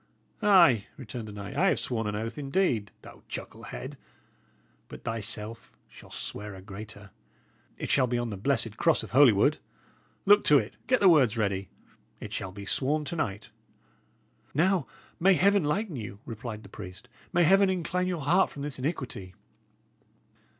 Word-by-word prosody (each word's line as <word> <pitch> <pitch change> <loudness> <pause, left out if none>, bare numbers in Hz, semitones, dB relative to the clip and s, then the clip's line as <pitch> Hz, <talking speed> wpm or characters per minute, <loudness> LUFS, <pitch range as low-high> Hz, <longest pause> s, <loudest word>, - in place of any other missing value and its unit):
"Ay," 170 - +5
returned 120 -3 -7
the - - -7
knight, 100 -1 -7
"I 190 - +3
have - - +2
sworn 115 -3 -1
an 105 - -2
oath, 115 +2 -4
indeed, 135 - 0
thou - - -13
chucklehead; - - -7 0.9
but - - -11
thyself 115 0 -5
shalt - - -15
swear 105 -1 -6
a 95 - -10
greater. 100 0 -9 0.7
It - - -3
shall 130 - +4
be 120 0 0
on 120 -1 -2
the - - -4
blessed 115 0 -1
cross 165 -3 +3
of - - -9
Holywood. 125 -7 +5 0.7
Look 205 +1 +6
to 150 - +7
it; 110 -4 -2
get 255 -1 +3
the 195 - +6
words 135 - +5
ready. 100 -3 -1 0.5
It - - -8
shall 95 - -4
be 100 +1 -9
sworn 150 +8 0
to 170 - -4
night." 105 -10 -3 1.0
"Now, 175 0 +2 0.3
may 190 +2 +5
Heaven 200 +1 +4
lighten 170 +2 -1
you!" 105 -3 -7
replied 115 -1 -7
the 100 - -13
priest; 90 -2 -10 0.2
"may 175 -1 +3
Heaven 195 +4 +5
incline 180 0 -1
your 175 -4 -2
heart 175 +7 +3
from 140 - -8
this 145 -2 -3
iniquity!" 130 - -4
125 Hz, 165 wpm, -28 LUFS, 105-170 Hz, 1.0 s, to